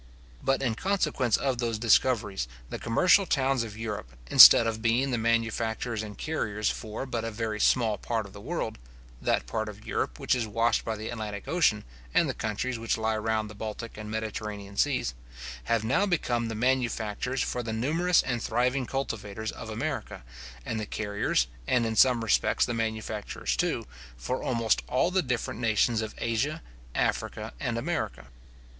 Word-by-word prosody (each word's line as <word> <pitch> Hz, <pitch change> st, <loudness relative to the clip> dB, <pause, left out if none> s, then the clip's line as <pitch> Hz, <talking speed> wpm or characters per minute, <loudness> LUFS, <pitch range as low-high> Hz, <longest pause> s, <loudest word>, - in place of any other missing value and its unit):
But 135 Hz, 0 st, +1 dB
in 120 Hz, -4 st, +1 dB
consequence 150 Hz, -, +1 dB
of 130 Hz, -3 st, -1 dB
those 115 Hz, -2 st, -1 dB
discoveries, 110 Hz, -, +2 dB, 0.2 s
the -, -, -4 dB
commercial 180 Hz, -, +4 dB
towns 135 Hz, -3 st, +2 dB
of 110 Hz, -2 st, -6 dB
Europe, 105 Hz, -, -5 dB, 0.2 s
instead 115 Hz, -, +11 dB
of 110 Hz, -1 st, -2 dB
being 120 Hz, +4 st, +2 dB
the 125 Hz, -, +1 dB
manufacturers 115 Hz, 0 st, 0 dB
and 105 Hz, -1 st, -8 dB
carriers 105 Hz, -9 st, -1 dB
for 110 Hz, +3 st, -5 dB
but 120 Hz, -4 st, -3 dB
a 115 Hz, -, -2 dB
very 110 Hz, -1 st, -3 dB
small 110 Hz, -3 st, +3 dB
part 115 Hz, -2 st, -2 dB
of 100 Hz, -, -12 dB
the 100 Hz, -, -10 dB
world 125 Hz, -4 st, -3 dB, 0.4 s
(that -, -, +1 dB
part 110 Hz, -1 st, -3 dB
of 105 Hz, 0 st, -11 dB
Europe -, -, -2 dB
which -, -, +1 dB
is 120 Hz, -3 st, 0 dB
washed 115 Hz, +2 st, +1 dB
by 110 Hz, -, -2 dB
the 110 Hz, +1 st, -6 dB
Atlantic 105 Hz, -3 st, -5 dB
ocean, 155 Hz, -12 st, +2 dB, 0.3 s
and -, -, +4 dB
the -, -, -1 dB
countries 115 Hz, +3 st, -3 dB
which 115 Hz, 0 st, 0 dB
lie 110 Hz, 0 st, 0 dB
round 110 Hz, 0 st, -1 dB
the 105 Hz, -, -10 dB
Baltic 110 Hz, +2 st, -6 dB
and 105 Hz, 0 st, -7 dB
Mediterranean 105 Hz, -2 st, -5 dB
seas), 125 Hz, -, +1 dB, 0.5 s
have 115 Hz, -2 st, +1 dB
now 135 Hz, -, +2 dB
become 120 Hz, -10 st, 0 dB
the 115 Hz, -, -4 dB
manufacturers 125 Hz, 0 st, 0 dB
for 125 Hz, -, -2 dB
the 115 Hz, -2 st, -4 dB
numerous 160 Hz, +10 st, +2 dB
and 120 Hz, -3 st, -2 dB
thriving 125 Hz, +3 st, 0 dB
cultivators 110 Hz, -5 st, -3 dB
of -, -, -8 dB
America, -, -, -4 dB, 0.4 s
and 110 Hz, -, -2 dB
the 105 Hz, -, -4 dB
carriers, 105 Hz, -, 0 dB, 0.2 s
and 120 Hz, -2 st, +2 dB
in 110 Hz, -1 st, -1 dB
some 125 Hz, -1 st, +5 dB
respects 110 Hz, -, +2 dB
the 120 Hz, -, -3 dB
manufacturers 110 Hz, -2 st, -2 dB
too, -, -, 0 dB, 0.3 s
for 125 Hz, -, -3 dB
almost 115 Hz, -3 st, +1 dB
all 130 Hz, +8 st, +2 dB
the 190 Hz, 0 st, +2 dB
different 125 Hz, -5 st, -3 dB
nations 115 Hz, 0 st, +2 dB
of 110 Hz, 0 st, -5 dB
Asia, 135 Hz, +8 st, -1 dB, 0.3 s
Africa, -, -, -1 dB
and -, -, -2 dB
America. -, -, -3 dB
115 Hz, 175 wpm, -28 LUFS, 110-125 Hz, 0.5 s, instead